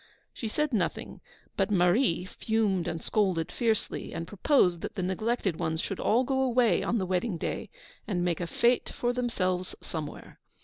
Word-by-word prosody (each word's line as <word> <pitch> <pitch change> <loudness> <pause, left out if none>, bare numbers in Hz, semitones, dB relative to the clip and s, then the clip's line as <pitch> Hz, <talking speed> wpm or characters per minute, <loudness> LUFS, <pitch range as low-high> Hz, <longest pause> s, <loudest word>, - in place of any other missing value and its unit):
She 225 - -4
said 300 +5 -1
nothing; 185 -6 -2 0.3
but - - +1
Marie 180 0 +3
fumed 195 -3 0
and 165 - -3
scolded 185 -6 +1
fiercely, 225 -3 -1
and 165 0 -4
proposed 185 - +3
that - - -5
the 185 - -2
neglected 190 -1 0
ones 160 0 -1
should 195 - -3
all 240 +4 +3
go 265 +1 0
away 245 -7 +3
on 235 - 0
the 190 - 0
wedding 185 +1 0
day, - - -3 0.4
and 180 -4 0
make 170 -2 0
a 175 - -2
fête 240 +7 +2
for 245 0 -1
themselves 185 -7 -1
somewhere. 155 -3 -7
195 Hz, 170 wpm, -29 LUFS, 175-235 Hz, 0.4 s, Marie